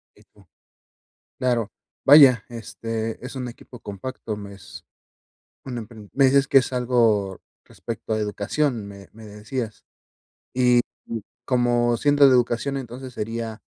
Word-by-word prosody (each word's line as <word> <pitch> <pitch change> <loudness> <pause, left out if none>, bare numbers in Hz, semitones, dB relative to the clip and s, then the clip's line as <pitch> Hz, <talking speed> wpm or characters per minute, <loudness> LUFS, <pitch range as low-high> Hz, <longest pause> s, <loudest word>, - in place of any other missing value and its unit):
Eh, - - -21
co - - -22 0.9
claro, 120 -4 0 0.3
vaya, 135 -6 +8
este, 115 0 -5
es 130 - -7
un 125 -1 -4
equipo 120 0 -12
compacto, 105 +1 -6
me 100 -1 -9
es 90 -6 -13 0.8
un 125 -2 -5
empren 110 -2 -10
me 135 - +3
dices 135 +1 +3
que 135 - +7
es 130 - -2
algo 115 -6 +1 0.2
respecto 115 -1 -7
a 110 - +1
educación, 105 +3 -1
me 100 -1 -12
me 110 0 -13
decías. 110 +2 -6 0.7
Y 125 -1 +4 0.3
y 115 -2 -5 0.2
como 120 -1 +2
siendo 145 -1 +4
de 130 - +5
educación, 125 +3 +1
entonces, 130 0 -8
¿sería 115 0 -5
120 Hz, 140 wpm, -23 LUFS, 110-130 Hz, 0.9 s, vaya